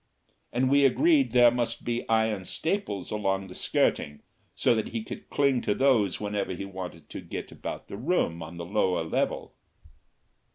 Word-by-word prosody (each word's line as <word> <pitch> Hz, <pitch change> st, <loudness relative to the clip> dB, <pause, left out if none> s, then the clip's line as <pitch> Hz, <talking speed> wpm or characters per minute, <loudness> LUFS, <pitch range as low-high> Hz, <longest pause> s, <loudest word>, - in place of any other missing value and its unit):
And 130 Hz, +2 st, +1 dB
we 140 Hz, 0 st, +5 dB
agreed 295 Hz, -, +4 dB
there 120 Hz, -1 st, +6 dB
must 120 Hz, -1 st, -2 dB
be 120 Hz, 0 st, -2 dB
iron 110 Hz, -3 st, +2 dB
staples 160 Hz, -, -2 dB
along 95 Hz, -2 st, -1 dB
the -, -, -9 dB
skirting, 75 Hz, -4 st, 0 dB, 0.3 s
so -, -, +3 dB
that 110 Hz, -2 st, -1 dB
he 115 Hz, -1 st, -4 dB
could -, -, -9 dB
cling 140 Hz, -3 st, +2 dB
to 105 Hz, -, 0 dB
those 120 Hz, -9 st, +3 dB
whenever 105 Hz, -2 st, -2 dB
he 95 Hz, +2 st, -5 dB
wanted 95 Hz, -2 st, -8 dB
to -, -, -6 dB
get -, -, -7 dB
about -, -, -7 dB
the -, -, -7 dB
room 120 Hz, -, 0 dB
on 80 Hz, +1 st, -8 dB
the 85 Hz, -, -5 dB
lower 90 Hz, -2 st, +1 dB
level. 80 Hz, -, -2 dB
110 Hz, 170 wpm, -27 LUFS, 95-125 Hz, 0.3 s, there